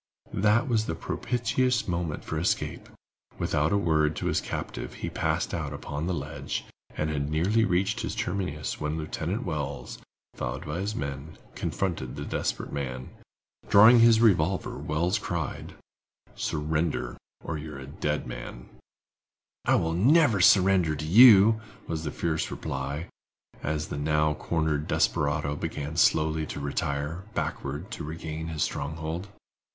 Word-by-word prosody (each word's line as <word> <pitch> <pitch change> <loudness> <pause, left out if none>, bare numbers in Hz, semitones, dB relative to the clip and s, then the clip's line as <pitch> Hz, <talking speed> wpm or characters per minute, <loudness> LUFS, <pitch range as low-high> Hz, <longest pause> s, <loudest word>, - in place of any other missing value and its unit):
That 105 +5 +3
was 110 -3 +1
the 80 - -2
propitious 125 +7 0
moment 85 -4 -2
for 80 - -2
escape. 85 - -1 0.5
Without 75 +2 +1
a 100 - +3
word 80 -4 +2
to - - -4
his - - +1
captive, - - -5
he - - -5
passed - - -1
out - - -3
upon 75 +4 -4
the 90 - 0
ledge, 75 0 -4 0.3
and 75 0 0
had 70 -1 -2
nearly 95 +9 +2
reached 95 +2 0
its - - -3
terminus 90 -6 -3
when 75 +1 -1
Lieutenant 80 +7 -3
Wells, 75 -7 -4 0.3
followed 65 +2 -4
by 75 +3 -3
his 105 +3 -2
men, 70 +2 -5 0.2
confronted 85 -10 -2
the - - -5
desperate - - -3
man. 65 -3 -4 0.6
Drawing 110 +4 +8
his 115 -1 +7
revolver, 95 -4 +2
Wells 85 +7 0
cried: 85 -7 -4 0.6
"Surrender 75 -4 -1 0.3
or 80 -2 -3
you 75 0 -7
are - - -7
a 65 - -8
dead 75 +1 -2
man!" - - -8 1.0
"I - - +4
never 110 - +4
will - - +1
surrender 95 -4 +5
to 75 +1 -5
you," 110 +3 +8 0.2
was 80 -1 -3
the 75 - -3
fierce 80 0 -1
reply, 70 +4 -4 0.6
as 75 0 -2
the 70 - -4
now 75 +1 +2
cornered 80 -1 -1
desperado 70 0 +1
began 75 -1 -4
slowly 80 -1 +3
to - - -5
retire, 70 +4 -2
backward, 75 +7 -3
to - - -5
regain 80 +1 -5
his 80 -2 -1
stronghold. 80 +5 -3
80 Hz, 145 wpm, -27 LUFS, 75-95 Hz, 1.0 s, Drawing